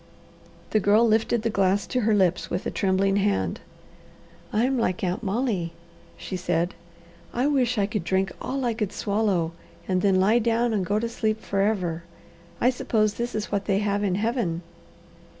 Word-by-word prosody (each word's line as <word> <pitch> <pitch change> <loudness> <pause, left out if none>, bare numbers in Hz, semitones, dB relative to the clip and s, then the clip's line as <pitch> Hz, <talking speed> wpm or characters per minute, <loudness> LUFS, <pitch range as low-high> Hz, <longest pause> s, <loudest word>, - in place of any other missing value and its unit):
The 215 - +3
Girl 210 +4 +4
lifted 220 +1 +2
the 230 - 0
glass 195 0 +2
to 255 - -1
her 215 -1 +3
lips 185 -3 +1
with 180 - -3
a - - -1
trembling 195 +1 +1
hand. 195 - 0 0.9
"I'm 250 +4 +1
like 185 -5 -1
Aunt 180 0 -1
Molly," 200 -5 -1 0.4
she 190 - -6
said; 175 -1 0 0.6
"I 245 +3 +1
wish 255 -4 +2
I 200 - +3
could 210 -2 -3
drink 190 +1 0
all 270 -1 -2
I 235 - +1
could 215 -3 -2
swallow, 200 -5 0 0.4
and 185 -1 +1
then 195 -1 +3
lie 210 +5 +4
down 235 0 +1
and 200 -3 +1
go 200 +3 0
to 230 +2 0
sleep 220 -1 -1
forever. 195 -5 0 0.6
I 250 - +4
suppose 215 -4 +1
this 240 0 -4
is 215 -1 -3
what 200 -1 -1
they 195 -2 +2
have 205 0 0
in 190 -3 +1
Heaven." 205 -6 -1
205 Hz, 175 wpm, -25 LUFS, 190-230 Hz, 0.9 s, Girl